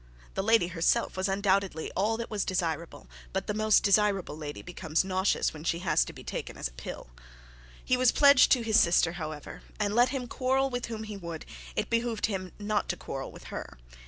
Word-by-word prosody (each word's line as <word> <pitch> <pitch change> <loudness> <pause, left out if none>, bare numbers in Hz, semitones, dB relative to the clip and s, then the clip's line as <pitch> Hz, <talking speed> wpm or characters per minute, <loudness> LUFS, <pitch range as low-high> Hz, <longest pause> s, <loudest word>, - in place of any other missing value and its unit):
The - - -1
lady 220 -3 +3
herself 170 -1 +1
was 185 +1 -1
undoubtedly 195 -4 0
all 215 +4 +1
that 230 0 -6
was 210 -2 0
desirable; 165 - -3 0.3
but - - -1
the 210 - -2
most 215 0 +3
desirable 200 -5 +2
lady 150 -1 -7
becomes 160 -2 -1
nauseous 190 0 +1
when 155 -1 -9
she 170 - 0
has 170 - +2
to - - -7
be - - -12
taken - - -5
as - - -2
a - - -15
pill. - - -8 0.7
He 255 - +2
was 255 -1 +4
pledged 280 -3 +6
to 250 -3 +1
his 220 0 +4
sister, 170 -1 +4
however, 155 -3 -7 0.2
and 205 -1 0
let 245 +3 +5
him 265 -3 -3
quarrel 265 +2 0
with 245 0 -3
whom 220 -1 -5
he 215 -2 -6
would, 170 -4 -7 0.3
it - - -2
behoved 230 -1 0
him 185 -4 -3
not 210 0 -1
to 175 - -1
quarrel 135 -4 -6
with - - -13
her. - - -7
195 Hz, 205 wpm, -29 LUFS, 170-225 Hz, 0.7 s, pledged